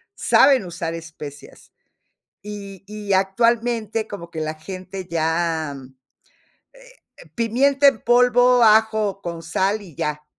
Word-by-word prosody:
saben 265 -6 +4
usar 170 -1 -5
especias. 155 -3 -11 0.7
Y 200 -2 -9
y 210 -1 -4
actualmente 225 +2 0
como 170 -5 -8
que 160 -1 -6
la 155 0 -3
gente 185 +3 -8
ya, 160 -2 -1
mm 130 -1 -13 0.8
eh, - - -19
pimienta 270 +5 +3
en 275 -6 +2
polvo, 245 0 +4
ajo, 215 -2 +3
con 170 -3 -6
sal, 190 +6 -1
y 175 -7 -14
ya, 150 +2 -3
195 Hz, 120 wpm, -21 LUFS, 165-230 Hz, 0.8 s, saben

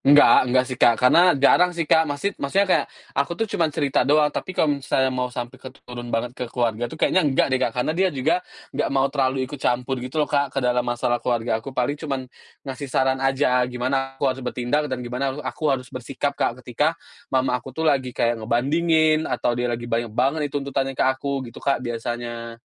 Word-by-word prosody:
Enggak 140 -3 +6
enggak 130 +1 +3
sih, 130 0 -6
Kak. 120 -2 +6
Karena 170 +7 +5
jarang 175 +6 +4
sih, 165 - 0
Kak. 160 +1 +3
Masid 145 +8 -2
maksudnya 190 +9 +2
kayak - - +2 0.3
aku 170 - -1
tuh 225 - 0
cuman 165 -2 +2
cerita 145 -2 0
doang. 150 +1 +3
Tapi 185 - -5
kalau 145 -2 +1
misalnya 130 0 +1
mau 125 0 -1
sampai 120 -1 -7
ke - - -8
t - - -18
turun 120 -1 -8
banget 120 +1 -2
ke 125 -1 -6
keluarga 120 -1 -1
tuh 155 - -9
kayaknya 185 - +3
enggak 140 -3 +1
deh, 130 - +2
Kak. - - +1
Karena 125 +5 0
dia 185 +3 +2
juga 155 +4 0 0.3
enggak 145 - -1
mau 135 0 +1
terlalu 130 -2 +1
ikut 135 +1 -8
campur 125 +1 -1
gitu 125 +4 -7
loh, - - -14
Kak, 140 -1 +1
ke - - +3
dalam 125 0 +2
masalah 120 0 0
keluarga 115 -2 -1
aku. 135 - -9
Paling 145 +4 -1
cuman 140 -4 -2 0.4
ngasih 135 +1 -6
saran 130 0 +1
aja, 135 -1 +2
gimana 135 +2 -2
aku 135 - -3
harus 130 -1 0
bertindak 125 +4 -1
dan 125 -2 -4
gimana 130 +3 -2
haru - - -8
aku 155 - -5
harus 130 -2 -1
bersikap, 135 +3 -3
Kak, 125 -2 -2
ketika 150 +7 0 0.3
Mama 130 -1 +1
aku 135 - -11
tuh 160 - -1
lagi 135 -5 +2
kayak 115 -1 +1
ngebandingin 155 +7 +2
atau 120 -1 0
dia 120 +1 -1
lagi 120 0 -3
banyak 120 0 -1
banget 135 +7 +1
itu 145 - -5
tuntutannya 135 -1 -2
ke - - +2
aku 130 +1 -1
gitu, - - -11
Kak, 140 - +1
biasanya. 120 0 -5
130 Hz, 220 wpm, -23 LUFS, 125-145 Hz, 0.4 s, Enggak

